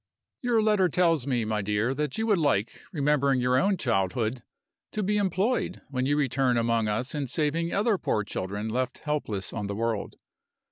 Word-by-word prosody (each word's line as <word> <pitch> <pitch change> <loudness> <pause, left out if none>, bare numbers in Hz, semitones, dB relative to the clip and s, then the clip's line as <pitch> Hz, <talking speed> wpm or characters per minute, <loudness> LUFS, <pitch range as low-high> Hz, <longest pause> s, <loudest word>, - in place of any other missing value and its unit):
"Your 235 -3 +2
letter 210 -4 +3
tells 165 -5 +2
me, 120 -4 0
my 110 -1 -1
dear, 105 +5 0
that 150 0 -2
you 220 - 0
would 210 -5 +3
like 125 -9 0
remembering 140 -4 +2
your 125 +1 +2
own 195 0 +2
childhood 115 - 0 0.5
to 215 - -1
be 210 +2 +1
employed 200 +5 0
when 130 -1 -1
you 145 +1 +2
return 130 -3 +1
among 115 -1 +1
us 110 +6 -1
in 145 -3 -2
saving 160 +5 0
other 205 -1 +1
poor 105 - 0
children 100 +2 -4
left 125 +3 -2
helpless 125 -10 -2
on 105 -3 -3
the 100 - -3
world. 115 -1 -2
135 Hz, 180 wpm, -27 LUFS, 115-170 Hz, 0.5 s, letter